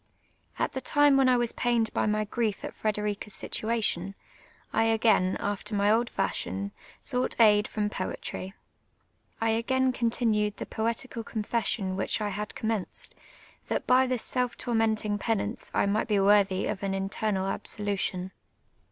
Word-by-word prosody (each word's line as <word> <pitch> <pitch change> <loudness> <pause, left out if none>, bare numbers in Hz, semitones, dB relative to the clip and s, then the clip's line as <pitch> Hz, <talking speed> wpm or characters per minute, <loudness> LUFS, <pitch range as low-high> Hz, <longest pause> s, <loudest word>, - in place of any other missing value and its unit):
At - - 0
the 265 - -3
time 290 0 +4
when 270 -1 +5
I 250 - +5
was 240 -1 0
pained 235 -2 0
by - - +1
my 215 0 +1
j^rief 215 -1 -2
at - - -5
Frederica's 210 -1 -2
situation, 210 -4 -1 0.6
I 225 - +3
a^ain, 220 -4 +3
after 205 +1 -3
my 205 +1 +3
old 235 +2 +2
fashion, 200 +1 -2 0.3
sought 250 -2 0
aid 210 -2 +6
from 210 -1 -1
poetry. 190 0 -5 0.8
I 225 0 +2
a<:;ain 260 +3 +2
continued 225 -4 +1
the - - -5
poetical 230 +1 -2
confession 215 -3 -1
which 190 - 0
I 210 -1 -1
had 210 +1 -5
commenced, 220 -4 -3 0.5
that - - -1
by 260 +1 +4
this 250 -2 0
self 250 -1 -1
tormentin«; 220 -3 0
])enance 220 0 -2
I - - +2
mi;;ht 205 +3 0
be 210 - +1
worthv 195 -1 +3
of - - -6
an 195 -1 -1
internal 195 0 -1
absolution. 195 -2 -2
215 Hz, 150 wpm, -28 LUFS, 200-235 Hz, 0.8 s, aid